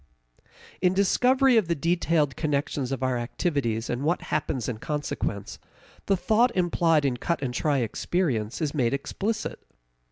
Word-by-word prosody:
In 180 0 +3
discovery 250 +6 +4
of 210 -6 +3
the 170 - +1
detailed 165 -3 +1
connections 140 -3 -1
of 135 -1 -2
our 130 -2 +1
activities 120 -3 -1
and 120 +1 -2
what 165 +5 0
happens 135 -5 -1
in 115 -3 -4
consequence, 145 -9 -3 0.5
the 195 - +3
thought 225 +6 +3
implied 170 -4 +2
in 130 -3 0
cut 170 +4 -2
and 125 -2 -2
try 145 +3 +1
experience 125 - -1
is 145 - -1
made 135 -3 +1
explicit. 205 +10 -3
150 Hz, 150 wpm, -26 LUFS, 130-180 Hz, 0.5 s, discovery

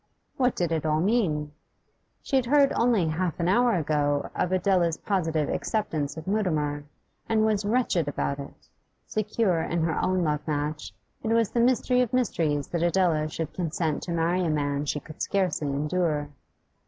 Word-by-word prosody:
What 250 -2 +1
did 175 -2 -1
it 160 -2 0
all 155 -1 +1
mean? 165 -7 +1 0.7
She - - -2
had 260 -2 +2
heard 280 +1 +4
only 230 -7 +2
half 170 +2 -2
an 170 - 0
hour 240 +5 +3
ago 145 -3 0
of 180 - -1
Adela's 180 -3 +2
positive 160 -7 0
acceptance 160 -9 -2
of 160 - -7
Mutimer, 155 -8 -1 0.4
and 220 -1 +3
was 210 -2 +1
wretched 205 - +1
about 140 -1 -2
it; 140 - -10 0.4
secure 210 -5 0
in 165 0 -1
her 160 -2 0
own 185 -1 +1
love 150 -2 +1
match, 150 -3 -2 0.3
it - - -4
was 230 -1 +2
the 240 - 0
mystery 250 +1 +3
of 250 -2 -1
mysteries 160 - +1
that 170 - -2
Adela 170 -3 +2
should 160 0 -5
consent 165 -3 -2
to 175 - -5
marry 170 +2 +1
a 170 - 0
man 145 -1 -1
she 150 - -1
could 155 +2 -12
scarcely 185 -7 0
endure. 150 +1 -1
170 Hz, 170 wpm, -26 LUFS, 150-210 Hz, 0.7 s, heard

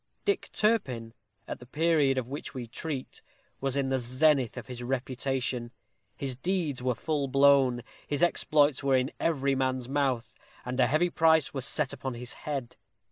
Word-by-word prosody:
Dick 405 - 0
Turpin, 130 - 0 0.3
at - - -5
the 125 - -13
period 150 -2 +2
of 125 -2 -1
which 140 +1 -7
we 125 -2 -4
treat, 135 +3 -6 0.4
was 135 0 -1
in 135 -1 +1
the 135 0 +1
zenith 130 +1 +2
of - - -6
his 125 -2 -7
reputation. 130 -1 -2 0.5
His 135 -2 -3
deeds 160 -2 -1
were 125 -1 0
full 150 -1 -1
blown; 135 -3 +4 0.2
his 145 +2 0
exploits 150 -5 +3
were 135 -1 +3
in 130 +2 +1
every 140 -4 +1
man's 130 -2 -1
mouth; 135 -4 0 0.3
and 125 +1 -3
a 125 - +5
heavy 155 +6 +2
price 160 -5 +3
was 135 -1 -3
set 150 -4 0
upon 130 -2 -4
his 120 +1 -7 0.2
head. 135 -5 -4
135 Hz, 170 wpm, -29 LUFS, 125-145 Hz, 0.5 s, a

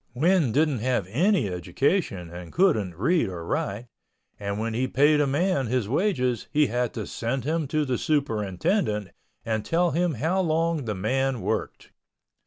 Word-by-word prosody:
Win 160 -1 +3
didn't 145 -1 +2
have 125 -4 0
any 165 - +2
education 90 - -1
and 85 -1 -9
couldn't 110 - +2
read 145 - +2
or 85 -3 -6
write—and 100 0 -5
when 115 +1 -2
he 125 +3 0
paid 150 +3 +4
a 145 - +2
man 145 -1 +1
his 120 -3 0
wages 130 - 0
he 150 0 +3
had 120 -1 -1
to - - -5
send 120 +2 -3
him 155 +1 -1
to 155 +2 0
the 130 -3 -1
superintendent 110 - 0 0.4
and 110 -2 -1
tell 170 +6 +1
him 170 0 0
how 165 - 0
long 165 -3 0
the 105 -2 -2
man 130 +6 0
worked. - - -3
130 Hz, 160 wpm, -25 LUFS, 110-160 Hz, 0.4 s, paid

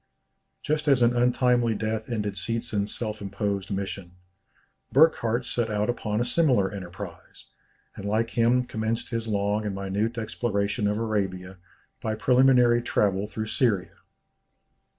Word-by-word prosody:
Just 150 0 -1
as 135 -4 +4
an 120 +1 +3
untimely 120 -1 +2
death 110 +1 -3
ended 105 -4 -2
Seetzen's 110 +1 -1
self 110 -3 -3
imposed 100 -1 -3
mission, 95 -2 -4 0.8
Burckhardt 125 -5 +3
set 120 -2 -1
out 105 +2 0
upon 105 -3 -3
a 120 - +1
similar 120 - +2
enterprise, 90 -4 -9 0.5
and - - -8
like 110 +3 0
him 120 +1 +3
commenced 110 0 -3
his 115 -1 -3
long 105 0 0
and 105 -2 -3
minute 100 +4 -2
exploration 105 -2 -1
of 105 +1 0
Arabia 95 -4 -2 0.4
by 110 -1 -2
preliminary 125 0 +4
travel 100 -4 0
through 110 +1 -4
Syria. 110 -6 0
110 Hz, 130 wpm, -26 LUFS, 100-120 Hz, 0.8 s, as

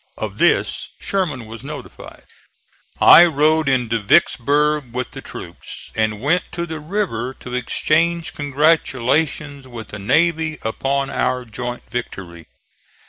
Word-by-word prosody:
Of - - -5
this - - +2
Sherman 160 - -1
was 115 +2 -9
notified. 150 +1 -10 0.8
I 170 - +9
rode 155 -1 +2
into 120 -4 +1
Vicksburg 145 +5 +2
with 125 -1 -3
the - - -8
troops, - - -9
and 110 -1 0
went 160 +8 +1
to 170 0 -2
the 160 -2 -6
river 150 - -3
to 125 - -10
exchange 165 +6 0
congratulations 145 -1 0
with 115 -4 -9
the 100 - -7
navy 155 +7 +1
upon 135 +5 -1
our 125 0 -1
joint 120 +2 -6
victory. 90 -8 -6
140 Hz, 125 wpm, -20 LUFS, 120-155 Hz, 0.8 s, I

